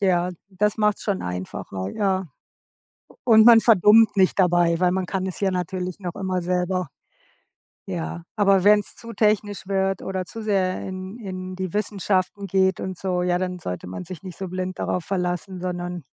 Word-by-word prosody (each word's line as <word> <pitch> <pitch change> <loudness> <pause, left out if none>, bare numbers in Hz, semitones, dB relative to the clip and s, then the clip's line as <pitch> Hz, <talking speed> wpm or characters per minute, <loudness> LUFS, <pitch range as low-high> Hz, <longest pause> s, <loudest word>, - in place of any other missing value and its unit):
ja. 180 -2 +2 0.2
Das 205 +3 0
macht's 210 -1 +1
schon 200 -3 -1
einfacher, 95 +1 -5
ja. 190 -3 0 0.8
U - - -20
und 220 -2 +6
man 230 -2 +9
verdummt 215 0 +5
nicht 190 +1 +3
dabei, 175 -2 +3
weil 180 - +4
man 190 0 -1
kann 190 +1 -2
es 190 - -5
ja 195 - +2
natürlich 180 0 -3
noch 180 -3 -5
immer 185 -2 -2
selber. 180 -1 -1 1.0
Ja, 80 +1 -4
aber 195 -2 +4
wenn's 210 0 +4
zu 230 0 -9
technisch 210 -2 +1
wird 195 -1 0
oder 190 -1 -3
zu 225 +4 -8
sehr 190 -3 0
in 190 +3 -7
in 185 -3 -6
die 185 -2 -4
Wissenschaften 200 -1 -1
geht 190 0 +2
und 185 -1 -5
so, 180 -1 -1
ja, 180 0 +1
dann 180 0 -3
sollte 90 - -6
man 95 - -6
sich 175 -3 -9
nicht 185 -2 -9
so 190 - -4
blind 185 0 -4
darauf 180 - -2
verlassen, 180 0 -3
sondern 175 -1 -4
185 Hz, 180 wpm, -23 LUFS, 180-200 Hz, 1.0 s, man